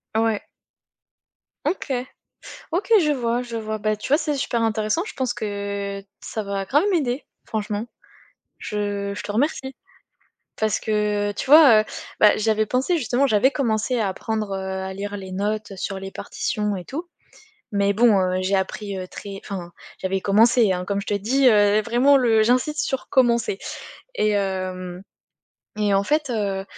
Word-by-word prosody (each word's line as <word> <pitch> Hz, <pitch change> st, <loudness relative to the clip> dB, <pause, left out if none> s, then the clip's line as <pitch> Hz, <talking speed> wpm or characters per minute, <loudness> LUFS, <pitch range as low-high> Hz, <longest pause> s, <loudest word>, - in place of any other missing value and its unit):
Ouais. 225 Hz, -1 st, +1 dB, 1.2 s
OK. 310 Hz, -7 st, -1 dB, 0.8 s
OK. 380 Hz, +6 st, -1 dB
Je 300 Hz, -2 st, +2 dB
vois, 240 Hz, -2 st, 0 dB
je 235 Hz, -2 st, -6 dB
vois. 215 Hz, -1 st, -3 dB
Beh, 215 Hz, 0 st, 0 dB
tu 210 Hz, -, -7 dB
vois, 290 Hz, +3 st, +4 dB
c'est 300 Hz, -3 st, -1 dB
super 235 Hz, -3 st, -1 dB
intéressant. 220 Hz, +6 st, 0 dB
Je -, -, -8 dB
pense 255 Hz, -2 st, -1 dB
que 200 Hz, -2 st, -4 dB, 0.2 s
ça 220 Hz, -, -4 dB
va 200 Hz, -1 st, -3 dB
grave 295 Hz, -, +3 dB
m'aider, 280 Hz, -6 st, 0 dB, 0.2 s
franchement. 210 Hz, 0 st, -3 dB, 0.7 s
Je 205 Hz, -1 st, -3 dB
je -, -, -6 dB
te -, -, -6 dB
remercie, 265 Hz, +3 st, -1 dB, 0.8 s
parce 220 Hz, -1 st, +1 dB
que, 210 Hz, -1 st, 0 dB
tu 205 Hz, -, -5 dB
vois, 275 Hz, -6 st, +8 dB
heu, -, -, -1 dB, 0.4 s
bah, 210 Hz, -, +6 dB
j'avais 215 Hz, 0 st, +1 dB
pensé, 260 Hz, -, +1 dB
justement, 255 Hz, 0 st, +1 dB
j'avais 235 Hz, +2 st, +4 dB
commencé 240 Hz, -2 st, 0 dB
à 215 Hz, -3 st, +1 dB
apprendre, 215 Hz, +2 st, -3 dB
heu, 195 Hz, -, -2 dB
à 190 Hz, 0 st, -4 dB
lire 200 Hz, +1 st, -5 dB
les 190 Hz, -2 st, -8 dB
notes, 210 Hz, +2 st, -2 dB
heu, -, -, -9 dB
sur 195 Hz, +1 st, -4 dB
les 195 Hz, 0 st, -7 dB
partitions 210 Hz, +1 st, -3 dB
et 180 Hz, -, -7 dB
tout, 320 Hz, -, -6 dB, 0.6 s
mais 200 Hz, -1 st, +2 dB
bon, 220 Hz, -1 st, +5 dB
heu, 185 Hz, 0 st, 0 dB
j'ai 190 Hz, +1 st, +1 dB
appris, 195 Hz, +1 st, -3 dB
heu, 185 Hz, -1 st, -5 dB
très 195 Hz, +1 st, -8 dB
enfin, 180 Hz, -4 st, -6 dB, 0.3 s
j'avais 190 Hz, 0 st, -1 dB
commencé, 215 Hz, +1 st, +4 dB
hein, 180 Hz, 0 st, -3 dB
comme 200 Hz, +2 st, -2 dB
je 200 Hz, -, -7 dB
te -, -, 0 dB
dis, 250 Hz, +7 st, +2 dB
heu, 210 Hz, -2 st, +5 dB
vraiment 245 Hz, +5 st, +4 dB
le 225 Hz, -4 st, +4 dB
j'insiste 255 Hz, +6 st, +1 dB
sur 265 Hz, -, -3 dB
commencer 235 Hz, -6 st, +2 dB, 0.6 s
et 215 Hz, -, +2 dB
hem, 185 Hz, -2 st, -2 dB, 0.8 s
et 210 Hz, -1 st, +1 dB
en 195 Hz, 0 st, +2 dB
fait, 295 Hz, 0 st, 0 dB
heu, 200 Hz, -4 st, -1 dB
215 Hz, 170 wpm, -23 LUFS, 200-245 Hz, 1.2 s, vois